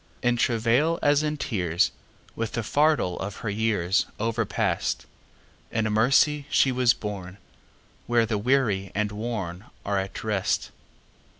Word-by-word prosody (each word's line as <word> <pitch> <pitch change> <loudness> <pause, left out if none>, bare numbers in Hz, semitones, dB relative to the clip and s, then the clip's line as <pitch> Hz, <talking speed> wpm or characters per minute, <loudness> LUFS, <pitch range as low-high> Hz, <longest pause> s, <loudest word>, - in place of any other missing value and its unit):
In 120 0 +3
travail, 120 +8 +2
as 145 0 +4
in 150 0 -1
tears, 90 - 0 0.4
With 115 -1 -3
the 115 - -2
fardel 145 - +2
of 100 +1 -4
her 105 - 0
yearsOverpast, 110 0 0 0.7
In 110 -1 0
mercy 140 +6 +3
she 135 - +3
was 125 -1 +3
borneWhere 100 - -4
the 105 -2 -1
weary 105 -6 +1
and 105 0 0
wornAre 105 -3 -5 0.3
at 95 - -8
rest. 105 -3 -1
110 Hz, 115 wpm, -26 LUFS, 100-125 Hz, 0.7 s, as